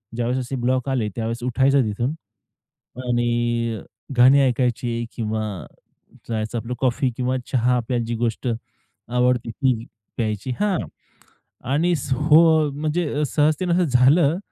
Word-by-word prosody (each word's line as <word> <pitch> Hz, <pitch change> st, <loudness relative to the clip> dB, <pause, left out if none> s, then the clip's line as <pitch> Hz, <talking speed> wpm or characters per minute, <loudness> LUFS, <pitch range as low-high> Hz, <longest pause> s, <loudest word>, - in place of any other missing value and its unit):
ज्यावेळेस 120 Hz, +2 st, -1 dB
असे 135 Hz, -, -4 dB
ब्लॉक 130 Hz, +2 st, 0 dB
आले, 125 Hz, -5 st, 0 dB
त्यावेळेस 115 Hz, +1 st, -3 dB
उठायचं 135 Hz, +2 st, +3 dB
तिथून 110 Hz, +4 st, -1 dB, 1.0 s
आणि 120 Hz, -1 st, 0 dB
अ, -, -, -12 dB, 0.3 s
गाणी 130 Hz, +3 st, +7 dB
ऐकायची 120 Hz, -2 st, 0 dB
किंवा 110 Hz, -1 st, -2 dB, 0.9 s
जायचं 110 Hz, +1 st, -2 dB
आपलं 115 Hz, +2 st, -4 dB
कॉफी 130 Hz, 0 st, +1 dB
किंवा 130 Hz, +1 st, 0 dB
चहा 125 Hz, 0 st, +2 dB
आपल्याला 120 Hz, 0 st, -2 dB
जी 115 Hz, +1 st, -3 dB
गोष्ट 115 Hz, +1 st, -2 dB, 0.6 s
आवडते 125 Hz, 0 st, +1 dB
ती 125 Hz, -2 st, 0 dB, 0.3 s
प्यायची 110 Hz, +1 st, -2 dB
हां, 205 Hz, -3 st, +1 dB, 1.0 s
आणि 165 Hz, +5 st, +2 dB, 0.2 s
हो, 155 Hz, +2 st, +4 dB
म्हणजे 150 Hz, +1 st, -1 dB
सहजतेने 155 Hz, +5 st, +1 dB
असं 180 Hz, +1 st, +3 dB
झालं, 140 Hz, +4 st, +4 dB
125 Hz, 125 wpm, -22 LUFS, 120-140 Hz, 1.0 s, गाणी